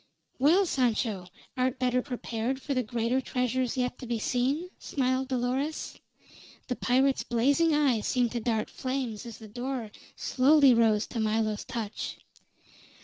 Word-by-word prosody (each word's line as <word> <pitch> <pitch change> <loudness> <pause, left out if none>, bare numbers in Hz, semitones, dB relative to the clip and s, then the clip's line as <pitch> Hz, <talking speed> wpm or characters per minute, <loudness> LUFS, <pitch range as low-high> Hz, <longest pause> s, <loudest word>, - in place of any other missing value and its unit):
"Well, 335 +9 +5
Sancho, 225 - 0 0.3
art 255 0 0
better 250 -1 +1
prepared 245 -1 -3
for 280 +1 -3
the 255 - +1
greater 240 +2 0
treasures 250 -1 -1
yet 250 -1 -1
to 250 - -7
be 235 0 -1
seen?" 270 +10 -1
smiled 260 -1 0
Dolores. 260 +4 -2 0.7
The 250 - 0
pirate's 265 +3 +2
blazing 285 +7 +2
eye 270 -7 +3
seemed 245 +1 +1
to 240 - -2
dart 220 -2 -1
flames 255 -4 -3
as 230 - -8
the 220 - -11
door 245 0 -4 0.2
slowly 275 0 +5
rose 225 -2 +3
to 230 - -5
Milo's 215 -1 0
touch. 230 -4 -4
250 Hz, 145 wpm, -28 LUFS, 230-265 Hz, 0.7 s, Well